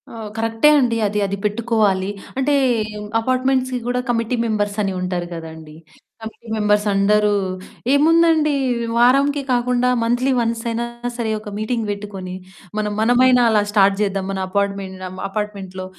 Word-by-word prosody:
ఆ! - - -12 0.2
కరెక్టే 225 +5 +3
అండి. 240 -3 +1
అది 210 +1 -2
అది 200 0 -3
పెట్టుకోవాలి. 210 -3 +1 0.3
అంటే 270 +2 +1 0.7
అపార్ట్మెంట్స్‌కి 255 +1 0
కూడా 250 0 0
కమిటీ 230 +1 0
మెంబర్స్ 205 -2 -1
అని 195 -2 -1
ఉంటారు 180 -1 -2
కదండీ. 160 -2 -9 0.5
కమిటీ 225 +1 -10
మెంబర్స్ 210 -1 +2
అందరూ 210 +1 +3 0.6
ఏముందండి 320 0 +4 0.4
వారంకి 275 +4 +4
కాకుండా 250 0 +1
మంత్లీ 245 +3 +1
వన్స్ 230 -1 -1
అయినా 230 +1 -2 0.3
సరే, 225 -2 -1
ఒక 210 0 -9
మీటింగ్ 225 +1 -2
పెట్టుకొని 200 -3 -6 0.4
మనం 210 -1 -1
మనమైనా 245 +2 +4
అలా 215 -2 +3
స్టార్ట్ 200 -1 +4
చేద్దాం. 195 -2 -1
మన 195 - -3
అపార్ట్మెన్ 200 -1 -2
ఆహ్, 185 - -10
అపార్ట్మెంట్‌లో 195 -3 -5
220 Hz, 135 wpm, -20 LUFS, 200-245 Hz, 0.7 s, ఏముందండి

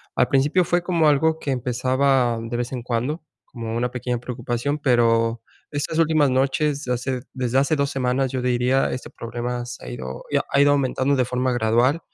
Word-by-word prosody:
al - - +2
principio 145 +7 +3
fue 175 +1 +1
como 170 -4 +2
algo 160 +2 +2
que 140 - -3
empezaba 125 0 +1
de 115 +1 -5
vez 120 0 -2
en 125 -3 -5
cuando, 125 +7 -2 0.2
como 115 -2 -6
una 125 +1 -1
pequeña 125 -1 -3
preocupación, 120 +3 -3
pero, 115 -4 +2 0.3
estas 145 +2 -2
últimas 155 -3 +3
noches, 140 +2 0
hace 125 +1 -2
desde 130 -1 -1
hace 140 +3 +3
2 140 -1 0
semanas, 130 -1 0
yo 130 - -2
diría, 125 +1 +1
este 130 - -6
problema 120 +1 -5
se 120 0 -9
ha - - -7
ido 65 +2 -7
ya - - +2
ha 140 - +3
ido 145 0 +5
aumentando 140 0 +1
de 130 - +2
forma 125 +1 -1
gradual. 120 +5 +2
130 Hz, 190 wpm, -22 LUFS, 120-140 Hz, 0.3 s, ido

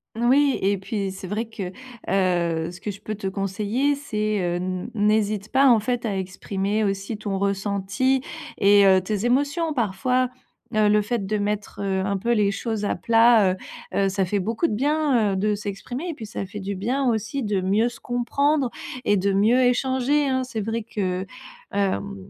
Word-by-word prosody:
Oui 260 +4 +3
et 200 +1 +2
puis 195 -1 -3
c'est 190 0 -8
vrai 215 +5 -2
que, 205 -5 -6 0.4
heu, 175 -3 +1
ce 180 - -12
que - - -4
je 200 -1 -7
peux 215 - -4
te 200 -2 -5
conseiller, 205 +8 0
c'est, 215 -7 -2
heu, 175 -1 0
n 185 +3 -3
n'hésite 210 -1 +1
pas 275 +1 +5
en 235 -3 +6
fait 240 +2 -2
à 200 -3 -1
exprimer 195 +3 -2
aussi 195 +2 -2
ton 205 -2 -3
ressenti 200 +6 0 0.3
et 200 0 +6
heu, 190 -1 +6
tes 205 +3 -2
émotions. 290 +6 +1
Parfois, 250 +2 0 0.4
heu, 215 -1 +3
le 210 0 +4
fait 210 -2 -2
de 215 +1 0
mettre, 205 0 -3
heu, 190 -1 0
un 200 0 0
peu 235 +5 0
les 210 -3 +3
choses 215 +1 -3
à 205 - 0
plat, 225 -3 +5
heu - - -7 0.4
heu, 195 -1 +2
ça 195 0 0
fait 200 +3 -1
beaucoup 225 - -1
de - - -2
bien, 270 -4 +2
heu, - - -1
de 210 +2 +1
s'exprimer 210 - -5
et - - -2
puis 230 - -8
ça 195 -2 -5
fait 205 +2 -7
du 195 +1 -3
bien 250 +8 -1
aussi 225 +3 -1
de 205 -3 0
mieux 200 +5 +2
se 240 - -13
comprendre 260 +3 0 0.3
et 205 - +3
de 195 +1 +1
mieux 215 +6 +4
échanger, 260 +3 +2
hein. 260 -1 +1
C'est 235 -4 -4
vrai 225 +2 -2
que, 185 -4 -2 0.5
hem, 200 0 -1
210 Hz, 195 wpm, -24 LUFS, 195-240 Hz, 0.5 s, en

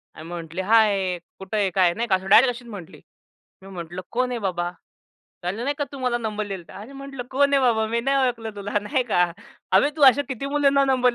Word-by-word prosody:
आणि 155 - -10
म्हटली, 170 +1 -5
“हाय, 200 -3 +3 0.2
कुठं 190 +2 -4
आहे? 200 -2 +2
काय?" 180 -1 +3
नाही 235 +5 -3
का. 195 - +3
असं 190 0 -5
डायरेक्ट 245 +5 +7
अशीच 240 0 -12
म्हटली. 195 -7 -10 0.6
मी 195 - -12
म्हटलं, 175 -1 -7
“कोण 250 +1 0
आहे, 245 - -2
बाबा?” 175 -4 -2 0.7
"काल 185 +6 -3
नाही 285 +3 -1
का, 290 - 0
तू 280 - -7
मला 250 -2 0
नंबर 215 -2 -3
दिला 190 -3 -5
होता.” - - -10
"अरे," 240 +6 -12
म्हटलं, 275 -2 -7
“कोण 280 +2 +2
आहे, 275 - +4
बाबा? 220 -3 +2
मी 230 +1 -1
नाही 275 +3 +1
ओळखलं 225 -3 -4
तुला.” 205 +1 -2
नाही 255 +6 -1
का. 175 - +5 0.5
“अबे, 285 - +5
तू 300 - -2
अशा 285 +3 -2
किती 265 +1 -4
मुलींना 280 -1 +3
नंबर" 255 -2 +2
225 Hz, 225 wpm, -23 LUFS, 190-260 Hz, 0.7 s, डायरेक्ट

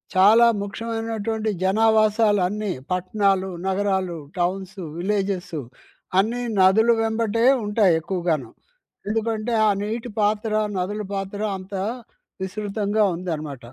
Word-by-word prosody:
చాలా 215 +5 +7
ముఖ్యమైనటువంటి 225 +1 -3
జనావాసాలన్నీ 210 -1 +2 0.2
పట్టణాలు, 190 +1 +1 0.2
నగరాలు, 190 -2 0 0.2
టౌన్స్, 190 +2 -2 0.2
విలేజెసు 190 -3 -2 0.6
అన్నీ 235 +5 0 0.2
నదులు 220 +5 +5
వెంబటే 225 0 0 0.2
ఉంటాయి 205 -4 +3
ఎక్కువగాను. 165 -8 -2 0.6
ఎందుకంటే, 225 +1 -1
ఆ - - +5
నీటి 230 +3 -4
పాత్ర, 210 +1 +1 0.3
నదుల 205 +4 -2
పాత్ర 195 +1 -4 0.2
అంతా 190 0 -5 0.6
విసృతంగా 205 +2 -1
ఉందనమాట. 155 -7 -5
205 Hz, 90 wpm, -23 LUFS, 185-220 Hz, 0.6 s, చాలా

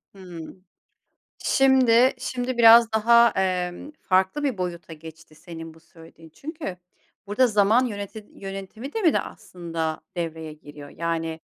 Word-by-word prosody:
Hıı. 175 -4 -10 0.8
Şimdi 260 -2 +4
şimdi 250 0 -4
biraz 230 0 +7
daha, 235 +2 +5
emm, 185 +6 -2
farklı 190 +10 +1
bir 255 -9 -1
boyuta 170 -2 -5
geçti 160 0 -13
senin 165 0 -10
bu 165 - -19
söylediğin. 165 0 -17
Çünkü 280 - -7 0.5
burada 250 +6 +2
zaman 215 +3 +3
yöneti 205 0 -7
yönetimi 195 +7 -8
de 445 - -3
mi 330 - +4
de - - +1
aslında 165 -3 -6 0.2
devreye 160 -2 -5
giriyor? 145 -1 -13
Yani 165 0 -4
190 Hz, 130 wpm, -24 LUFS, 165-235 Hz, 0.8 s, biraz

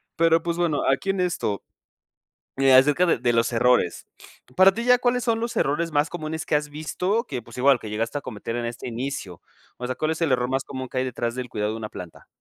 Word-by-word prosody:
pero, 165 0 +3
pues, 170 0 -2
bueno, 170 -4 +1
aquí 165 +8 -1
en 195 -1 0
esto, 165 - -1 1.0
eh, 135 -1 +5
acerca 150 +7 +5
de - - +3
de 120 0 +1
los 115 0 +2
errores, 120 -6 +2 0.5
para 190 +1 +7
ti, 235 +3 -4
¿ya 250 0 +5
cuáles 245 0 +1
son 230 -2 +1
los 235 +1 -3
errores 165 +4 0
más 145 +2 +1
comunes 160 -2 -4
que - - -1
has 150 0 +1
visto 180 - -2
que, 130 - -5
pues, 120 +1 -14
igual 135 0 +4
que 110 - -8
llegaste 115 +6 -2
a - - -8
cometer 115 -1 -6
en 120 -1 -2
este 120 +1 -6
inicio? 120 -7 -5 0.4
O 125 - -4
sea, 130 - -2
¿cuál 155 +4 -1
es 160 - -3
el 160 -5 +2
error 125 -1 +1
más 135 0 -1
común 130 -1 -6
que 130 - -3
hay 130 - +1
detrás 120 -2 -3
del 125 -1 -5
cuidado 105 0 -2
de - - -5
una 110 -1 -5
planta? 90 -4 -10
140 Hz, 240 wpm, -24 LUFS, 120-170 Hz, 1.0 s, para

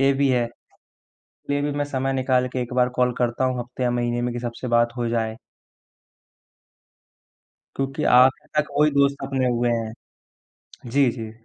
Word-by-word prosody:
ये 135 0 +4
भी 140 0 +1
है, 120 -2 +1 1.0
ले 145 0 +1
भी 145 0 -1
मैं 145 0 -1
समय 135 -1 -2
निकाल 130 -1 +1
के 130 - -2
एक 120 - -7
बार 125 -1 +3
कॉल 125 0 +2
करता 120 +1 0
हूँ 130 -1 0
हफ्ते 125 +1 -7
या 125 - +2
महीने 120 0 -1
में 125 0 -1
कि 120 - -3
सबसे 120 +1 -5
बात 120 0 +2
हो 120 -1 -1
जाए। 110 -1 -1 2.4
क्योंकि 135 0 -2
आखिर 130 +1 +4
तक 150 - 0
वही 150 0 +5
दोस्त 140 -1 +2
अपने 135 -1 0
हुए 120 0 +1
हैं। 115 -1 -2 1.0
जी, 135 -1 +3
जी, 115 -2 -7
125 Hz, 175 wpm, -23 LUFS, 120-135 Hz, 2.4 s, वही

